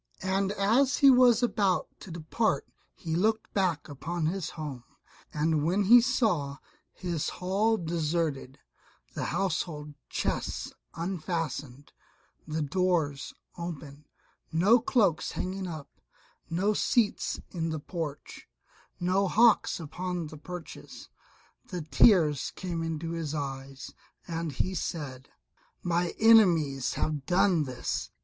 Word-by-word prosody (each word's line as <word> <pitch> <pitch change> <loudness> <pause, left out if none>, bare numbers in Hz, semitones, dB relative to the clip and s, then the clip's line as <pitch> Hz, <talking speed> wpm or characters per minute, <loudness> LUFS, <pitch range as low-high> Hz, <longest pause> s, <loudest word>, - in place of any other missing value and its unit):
And 190 +1 +1
as 225 +7 +3
he 275 -1 +7
was 245 -2 +5
about 200 -5 +1
to - - -11
depart 170 +7 -1 0.3
he 160 -2 -5
looked 220 +5 0
back 180 -7 0
upon 160 +4 -4
his 175 +1 -2
own - - -16 0.2
home, - - -24 0.5
and 155 0 +1
when 185 +6 +2
he 235 +5 +8
saw 210 - 0 0.3
his 175 -4 -3
hall 205 +5 +1
deserted, 160 -5 -2 0.6
the - - -3
household 160 -5 -2 0.2
chests - - -2 0.2
unfastened, 155 -6 -4 0.6
the 155 0 -2
doors 155 -3 0 0.2
open, 150 -4 -7 0.4
no 195 +9 +5
cloaks 215 - +1
hanging 190 +1 -3
up, 155 -4 -7 0.6
no 190 +6 +1
seats 215 0 +1
in 165 -2 -2
the 160 -1 -3
porch, 150 -2 -6 0.5
no 185 +3 +2
hawks 225 +1 +4
upon 175 +2 -4
the 155 0 -9
perches, 180 +1 -9 0.6
the 180 -4 -4
tears 155 - +4
came 175 -3 -4
into 165 0 -3
his 160 -2 -3
eyes, 135 -1 -6 0.3
and 165 -3 -3
he 185 +8 -1
said, 145 -6 -5 0.5
"My 175 0 0
enemies 170 - +5
have 150 -3 -2
done 180 -3 +3
this. 130 -2 -3
170 Hz, 120 wpm, -29 LUFS, 150-195 Hz, 0.6 s, he